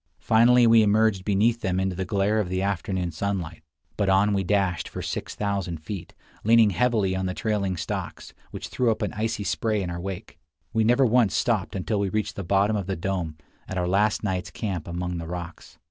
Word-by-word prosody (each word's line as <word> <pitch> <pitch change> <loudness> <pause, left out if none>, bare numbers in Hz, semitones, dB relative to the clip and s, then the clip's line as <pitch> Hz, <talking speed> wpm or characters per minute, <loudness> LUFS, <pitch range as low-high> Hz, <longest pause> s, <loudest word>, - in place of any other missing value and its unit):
Finally 120 +2 +5
we 115 -1 +6
emerged 105 -2 +3
beneath 110 +4 +2
them 95 0 0
into 95 -1 -1
the 95 - -2
glare 100 +2 +1
of 100 -4 -1
the 95 0 -1
afternoon 95 -2 -2
sunlight; 85 -1 -3 0.4
but 100 -2 +1
on 100 +2 +4
we 100 -1 +1
dashed 95 -3 0
for - - -7
6000 100 -5 -3
feet, 85 +4 -8 0.3
leaning 110 -1 +5
heavily 105 -2 +1
on 95 0 -1
the 90 - -3
trailing 100 -5 -1
stocks, - - -5 0.2
which - - -7
threw 125 -2 +1
up 110 - 0
an - - -2
icy 110 0 -2
spray 110 +2 0
in 90 -3 -3
our 85 0 -5
wake. 95 -1 -7 0.3
We 110 0 +2
never 120 +4 +4
once 115 -3 +3
stopped 110 -6 0
until 100 +3 -1
we 100 -1 0
reached 105 0 -2
the 100 - -4
bottom 100 +4 +2
of 100 -3 -3
the 95 - -1
dome, 85 -3 -3 0.3
at 95 - -5
our 90 -1 0
last 105 +4 +2
night's 95 -3 -2
camp 95 -7 -4
among 90 0 -3
the 85 - -6
rocks. 85 0 -8
100 Hz, 205 wpm, -25 LUFS, 90-110 Hz, 0.4 s, we